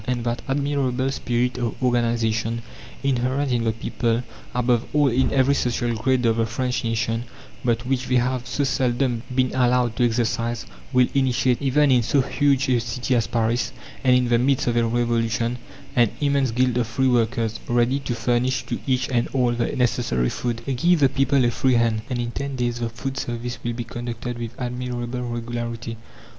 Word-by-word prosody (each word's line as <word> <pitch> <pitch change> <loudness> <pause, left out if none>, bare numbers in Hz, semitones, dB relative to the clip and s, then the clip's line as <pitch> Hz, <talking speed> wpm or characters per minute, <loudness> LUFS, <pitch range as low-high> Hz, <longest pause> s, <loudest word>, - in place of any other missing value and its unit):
And 125 -2 -1
that 120 0 -2
admirable 135 -2 0
spirit 125 -1 -1
of 120 -2 -2
organization 115 -2 +1 0.4
inherent 135 +1 0
in 120 -2 +1
the 110 - +2
people, 115 +1 -1 0.3
above 120 -1 +1
all 145 -2 +4
in 130 +2 +2
every 135 0 +3
social 120 -3 0
grade 125 +2 +1
of 115 0 +3
the 115 0 +1
French 125 +2 -2
nation, 115 0 -1 0.4
but 120 0 0
which 130 -1 -1
they 130 - +1
have 125 0 0
so 145 - -1
seldom 125 -2 0
been 130 -1 +2
allowed 125 -2 +2
to 125 - +2
exercise, 115 0 0 0.3
will 125 -2 +4
initiate, 130 -2 +2
even 140 +1 +3
in 125 -2 +5
so 135 +4 +2
huge 140 0 +1
a 125 -2 +3
city 120 +3 -1
as 115 - +1
Paris, 115 0 0 0.3
and 130 -1 +5
in 125 -1 +3
the 120 -1 +4
midst 135 +2 +2
of 120 - 0
a 120 - +3
Revolution, 115 0 0 0.4
an 120 -3 +4
immense 140 -2 +2
guild 125 +1 +1
of 120 - 0
free 130 +4 +1
workers, 115 -2 +1
ready 120 +3 +2
to 130 -3 -3
furnish 120 +2 0
to - - -3
each 130 -1 +1
and 120 -2 +1
all 125 -3 +2
the 120 0 -1
necessary 115 - +1
food. 120 -2 -3
Give 155 +6 +2
the 135 -2 +5
people 135 0 +2
a 120 - +2
free 130 +2 +2
hand, 115 -2 +2
and 125 - -1
in 120 -1 -2
ten 140 +2 -4
days 120 -1 -1
the 115 -1 -2
food 130 +3 -5
service 120 0 -4
will 120 - -2
be 120 0 -4
conducted 120 +1 -5
with 120 0 -6
admirable 125 0 -3
regularity. 120 -1 -4
120 Hz, 185 wpm, -23 LUFS, 115-130 Hz, 0.4 s, in